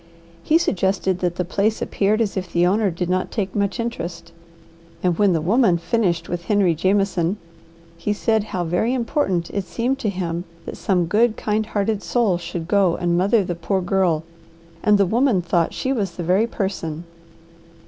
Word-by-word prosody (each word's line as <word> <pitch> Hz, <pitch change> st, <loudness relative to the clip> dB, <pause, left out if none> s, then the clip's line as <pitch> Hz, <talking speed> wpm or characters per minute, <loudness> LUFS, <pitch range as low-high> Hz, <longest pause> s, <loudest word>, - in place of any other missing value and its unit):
He 310 Hz, -, +3 dB
suggested 190 Hz, -, 0 dB
that 175 Hz, -2 st, -1 dB
the 180 Hz, -, -2 dB
place 205 Hz, +5 st, 0 dB
appeared 210 Hz, +3 st, +1 dB
as 210 Hz, -3 st, -1 dB
if 185 Hz, -2 st, -4 dB
the 175 Hz, 0 st, +3 dB
owner 200 Hz, +3 st, +2 dB
did 175 Hz, 0 st, -3 dB
not 185 Hz, +1 st, 0 dB
take 195 Hz, -4 st, -3 dB
much 200 Hz, +2 st, -1 dB
interest, 170 Hz, -7 st, -5 dB, 0.7 s
and 180 Hz, -2 st, +2 dB
when 200 Hz, -3 st, +4 dB
the 165 Hz, -, 0 dB
woman 195 Hz, +1 st, +3 dB
finished 175 Hz, 0 st, 0 dB
with 175 Hz, -1 st, -4 dB
Henry 200 Hz, -5 st, +3 dB
Jameson, 190 Hz, +1 st, +1 dB, 0.6 s
he 170 Hz, +5 st, -2 dB
said 220 Hz, 0 st, +1 dB
how 185 Hz, -4 st, -3 dB
very 180 Hz, +9 st, 0 dB
important 230 Hz, -, -1 dB
it 200 Hz, -, -2 dB
seemed 240 Hz, +9 st, -1 dB
to 215 Hz, -, -1 dB
him 175 Hz, -2 st, -3 dB, 0.2 s
that -, -, -6 dB
some 185 Hz, -5 st, +1 dB
good, 215 Hz, +6 st, +2 dB
kind 215 Hz, 0 st, -1 dB
hearted 205 Hz, 0 st, -1 dB
soul 210 Hz, -8 st, +1 dB
should 170 Hz, -1 st, -5 dB
go 190 Hz, -3 st, +3 dB
and 175 Hz, -1 st, 0 dB
mother 200 Hz, +4 st, +3 dB
the 180 Hz, -, -3 dB
poor 175 Hz, +3 st, -1 dB
girl, 180 Hz, -3 st, +1 dB, 0.6 s
and 210 Hz, -1 st, +4 dB
the 200 Hz, -, +4 dB
woman 235 Hz, +1 st, +2 dB
thought 170 Hz, -1 st, +1 dB
she 265 Hz, -, -2 dB
was 200 Hz, -8 st, -2 dB
the 175 Hz, -, -4 dB
very 190 Hz, +7 st, +2 dB
person. 175 Hz, -7 st, -3 dB
190 Hz, 180 wpm, -21 LUFS, 175-215 Hz, 0.7 s, when